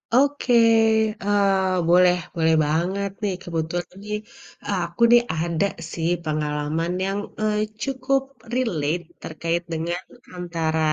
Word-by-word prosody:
Oke, 280 -1 +3 0.7
eee, 195 -2 +2
boleh 180 0 +6 0.2
boleh 160 -1 +3
banget 180 +6 0
nih. 200 -2 +1
Kebetulan 170 +1 -3
nih 210 0 -2 0.5
aku 180 0 -2
nih 240 0 +8
ada 170 +3 0 0.3
sih 165 0 -1
pengalaman 150 +2 -1
yang, 195 +1 -1 0.2
eee, 215 -1 +1 0.3
cukup 270 0 0 0.3
relate 175 - 0 0.2
terkait 165 +2 -2
dengan 170 +2 -2 0.4
antara 165 -2 -2
175 Hz, 110 wpm, -23 LUFS, 160-205 Hz, 0.7 s, nih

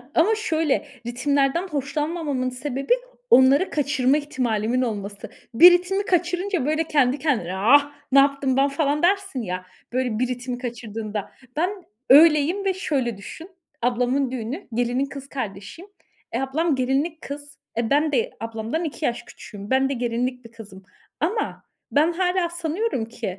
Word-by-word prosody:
Ama 410 +7 +4
şöyle 320 -10 0 0.2
ritimlerden 275 +7 +1
hoşlanmamamın 295 -2 -2
sebebi, 270 - -1 0.4
onları 275 - +6
kaçırma 280 -2 +1
ihtimalimin 250 -5 -1
olması. 205 -4 -4 0.2
Bir 345 +10 +9
ritmi 365 +3 +1
kaçırınca 360 -2 0
böyle 310 +2 +1
kendi 285 -3 +2
kendine, 220 - -1
ah, 285 +9 +4 0.2
ne 275 - +7
yaptım 275 -1 +2
ben 275 +1 +4
falan 290 +1 0
dersin 390 -6 +1
ya, 185 -3 -4 0.3
böyle 250 -4 -1
bir 255 - +1
ritmi 250 0 -4
kaçırdığında. 225 -4 -5 0.2
Ben 340 +4 +1 0.4
öyleyim 310 +6 +6
ve 385 - +2
şöyle 270 - -2
düşün; 320 - -10 0.3
ablamın 250 +2 +1
düğünü, 255 - -5
gelinin 245 +3 0
kız 275 0 -9
kardeşiyim. 230 - -7 0.4
Eee, 235 - 0
ablam 295 +4 0
gelinlik 275 +6 -1
kız. 285 0 -8 0.2
E, 230 -1 0
ben 300 +2 +2
de 250 -5 0
ablamdan 225 +7 -3
2 310 -1 -4
yaş 235 - -1
küçüğüm. 205 -2 -11
Ben 265 +1 +2
de - - -1
gelinlik 245 0 -2
bir 230 - -12
kızım. 205 -4 -12 0.4
Ama 405 +8 -2 0.3
ben 310 +4 +3
hâlâ 360 0 +1
sanıyorum 340 - -2
ki, 230 0 -8
275 Hz, 145 wpm, -23 LUFS, 240-320 Hz, 0.4 s, Bir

